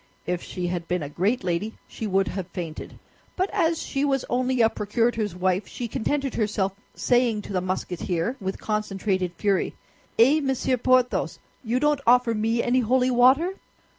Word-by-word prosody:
If 175 0 -2
she 180 - -5
had 175 -1 -3
been 180 -2 -1
a 145 - -5
great 195 - 0
lady 185 +5 -2
she 220 - -5
would 195 -1 +1
have 190 -3 -4
fainted; 170 -5 -7 0.4
but 375 +1 0
as 330 0 +1
she 275 0 -2
was 270 -3 +1
only 255 +1 +1
a 225 - +6
procurator's 220 -1 -1
wife, 185 +2 0
she 240 - -5
contented 275 +4 -1
herself 205 -3 0 0.2
saying 240 -4 +2
to - - -7
the 185 - +1
Musketeer 180 +2 -2
with 190 0 -3
concentrated 195 -3 -1
fury, 200 -3 0 0.4
"Eh, 270 +7 +6
Monsieur 265 -2 0
Porthos, 255 +1 +2 0.3
you 240 +2 0
don't 295 0 +2
offer 245 -1 +5
me 225 +2 0
any 250 +2 +2
holy 255 +2 +2
water?" 260 +8 +5
225 Hz, 165 wpm, -25 LUFS, 190-255 Hz, 0.4 s, a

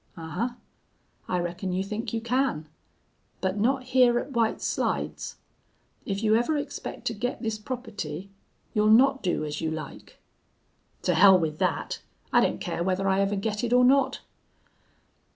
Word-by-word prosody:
"'Ahuh! 170 +10 -3 0.7
I 180 - 0
reckon 175 +2 -3
you 185 +1 0
think 210 +3 -4
you 230 - -2
can. 235 - 0 0.7
But 190 +2 -1
not 255 +3 +1
hyar 250 -2 +5
at 260 - -3
White 230 -3 +1
Slides. - - -2 0.7
If 200 +1 -2
you 215 0 +4
ever 240 +7 +2
expect 285 - -6
to - - 0
get 245 +4 -3
this 220 -1 -2
property 205 - -6 0.4
you'll 210 0 +3
not 270 +5 +5
do 175 -4 -1
as 150 0 -4
you 160 - 0
like.' 155 -1 -7 0.9
"'To - - +2
hell 190 -1 +8
with 155 -3 -2
that. - - -1 0.3
I - - +6
don't - - +1
care - - -3
whether 190 +1 0
I 195 0 +3
ever 200 +1 +1
get 210 +2 -2
it 240 0 0
or 250 0 +6
not.' 265 0 +3
215 Hz, 160 wpm, -27 LUFS, 185-245 Hz, 0.9 s, hell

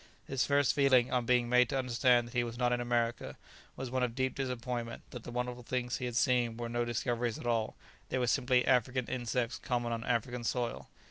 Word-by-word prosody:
His 135 -2 0
first 140 -2 +3
feeling, 130 -3 +4
on 125 -2 0
being 125 -1 +3
made 125 0 +4
to 135 - -1
understand 125 -1 +3
that 120 - -13
he 120 -1 +2
was 120 0 -6
not 125 0 +2
in 120 - 0
America, 120 -1 -1 0.4
was 130 -1 -5
one 130 0 0
of 120 -2 -1
deep 130 0 0
disappointment 125 -3 -4
that 125 - -7
the - - -6
wonderful 125 0 -3
things 125 0 -2
he 130 - -4
had 120 -1 -4
seen 120 -3 +2
were 120 0 -3
no 120 0 0
discoveries 120 0 -1
at - - -9
all; 115 -2 0 0.3
they - - -1
were 125 - +1
simply 125 0 +2
African 130 0 +2
insects 120 -1 -2
common 120 -1 -1
on 115 -1 -2
African 120 +1 -1
soil. 120 0 -2
125 Hz, 215 wpm, -32 LUFS, 120-125 Hz, 0.4 s, feeling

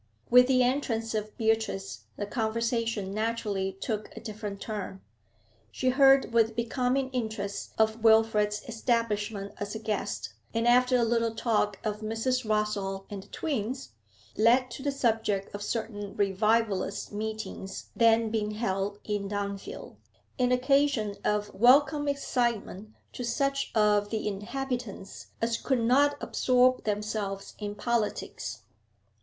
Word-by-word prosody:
With 250 +1 +8
the 255 -1 +4
entrance 245 -4 0
of 215 0 -3
Beatrice 110 - -1
the 205 - -2
conversation 230 -2 -1
naturally 210 -3 -1
took 210 +2 -4
a - - -4
different 215 -3 -6
turn. 200 -3 -5 0.7
She 255 - 0
heard 270 -1 +5
with 225 -1 +3
becoming 250 +3 0
interest 220 -5 -4
of 220 +1 +1
Wilfrid's 220 -2 +4
establishment 220 -3 -1
as 205 +1 -4
a - - -1
guest, 110 - -3 0.2
and, 230 +1 +1
after 250 +1 +5
a 240 - +2
little 230 -1 +1
talk 210 -3 +1
of 210 -1 -2
Mrs. 225 +4 -1
Rossall 200 -2 -1
and 200 -1 -5
the 195 - -16
twins, 240 - -3 0.5
led 245 +3 +4
to 240 - -7
the 285 +1 0
subject 225 -7 0
of 205 - -5
certain 205 -2 -4
'revivalist' 205 0 +1
meetings 215 -2 -5
then 230 -1 +4
being 210 -1 -1
held 200 -2 -1
in 205 -2 -2
Dunfield, 200 -1 -5 0.4
an 250 0 +3
occasion 255 -4 +2
of 210 0 0
welcome 285 +6 +5
excitement 235 -7 -1 0.2
to 250 - -5
such 275 +3 0
of 210 -1 +3
the 220 -1 -2
inhabitants 235 0 -5 0.2
as 230 0 +1
could 260 0 0
not 285 +5 +4
absorb 255 0 +2
themselves 210 -1 -3
in 205 -1 -4
politics. 225 0 -2
220 Hz, 130 wpm, -28 LUFS, 205-245 Hz, 0.7 s, With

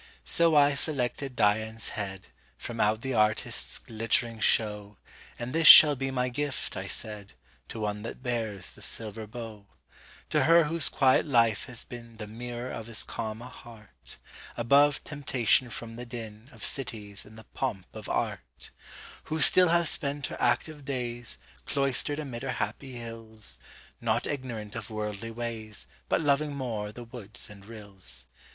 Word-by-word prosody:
So 165 -2 +4
I 145 -1 +6
selected 135 -2 0
Dian's 110 +1 +1
headFrom 95 -2 -6
out 110 +1 +2
the 135 0 -2
artist's 105 -1 +1
glittering 115 +1 -1
show; 105 -2 +1 0.4
And 120 +2 -5
this 165 0 +3
shall 150 -2 +12
be 135 0 -2
my 125 -1 0
gift, 140 +2 -3
I - - -5
said, 105 -2 -3 0.4
To 110 - -6
one 105 0 -2
that 115 +3 -7
bears 110 -7 -3
the - - -13
silver 110 -1 -4
bow; 110 -3 -9 0.6
To - - +3
her 165 +1 +7
whose 165 0 0
quiet 130 +2 +3
life 115 -5 +3
has 125 -3 -6
beenThe 115 -3 -9
mirror 120 +3 -6
of 115 0 -7
as 115 - +2
calm 110 +1 -5
a - - -8
heart, 115 -5 -14 0.4
Above 140 +4 +4
temptation 130 -4 +1
from 115 0 -7
the 120 - -6
dinOf 115 +1 -9
cities, 105 -7 -2
and 110 +1 -15
the 110 - -11
pomp 105 -9 -3
of - - -8
art; - - -4 0.5
Who 160 +1 -3
still 180 +3 +8
hath 170 -1 +3
spent 140 -1 -2
her - - -6
active 145 +5 0
daysCloistered 125 - -2
amid 135 -6 -5
her 135 -1 -2
happy 135 +2 -4
hills, 115 -2 -8 0.4
Not - - 0
ignorant 120 -7 -5
of 115 -2 -6
worldly 105 0 -4
ways, 115 -2 -6 0.2
But - - +2
loving 145 0 +1
more 110 -6 -3
the 120 +3 -9
woods 115 -2 -5
and 100 -1 -13
rills. 95 - -9
115 Hz, 150 wpm, -28 LUFS, 110-135 Hz, 0.6 s, shall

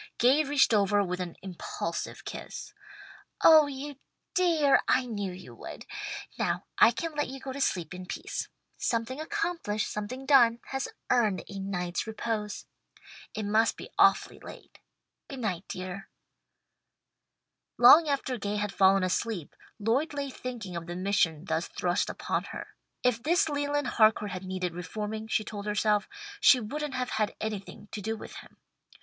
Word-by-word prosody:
Gay 265 +6 +5
reached 280 -4 +3
over 205 -1 +3
with 180 -1 -3
an 180 -2 -4
impulsive 185 -3 -5
kiss. - - -7 0.7
"Oh 315 -2 +8
you 285 0 -6 0.4
dear! 325 -6 +4
I 260 - +3
knew 205 -5 -3
you 180 -9 -11
would. 115 - -9 0.5
Now - - 0 0.2
I - - +9
can 280 +8 -3
let 295 0 -1
you 270 +1 -7
go 265 0 -6
to 280 - -5
sleep 175 - 0
in 180 0 -8
peace. - - -4 0.3
'Something 240 +4 -1
accomplished, 335 - -2
something 250 +6 -5
done, 240 -4 +6
has 270 0 -2 0.2
earned 215 -8 +2
a 200 -1 -7
night's 180 -1 -3
repose.' 215 -1 -3 0.7
It 215 - -2
must 220 +2 +2
be - - -9
awfully - - +4
late. - - -12 0.5
Goodnight 215 - -3
dear." 185 +2 -6 1.7
Long 300 +7 +9
after 265 -3 -1
Gay 205 +1 -2
had 205 -1 -2
fallen 195 0 +5
asleep, 185 -2 -2 0.2
Lloyd 250 +9 0
lay 280 -1 -3
thinking 235 -9 -6
of 170 0 -5
the 175 - -5
mission 180 -4 +1
thus 160 -1 -1
thrust 180 +1 0
upon - - -2
her. - - -8 0.3
If 250 -2 +2
this 320 +5 +3
Leland 290 0 0
Harcourt 215 -4 +3
had 185 0 -6
needed 185 -2 -3
reforming, 210 +5 -5
she 215 - +1
told 205 -1 -7
herself, 210 0 +1 0.3
she 260 - +7
wouldn't 285 +5 -4
have 250 -1 -2
had 215 -1 0
anything 210 -1 -5
to 210 - -5
do 220 +2 -2
with - - -9
him. - - -13
220 Hz, 155 wpm, -29 LUFS, 195-265 Hz, 1.7 s, I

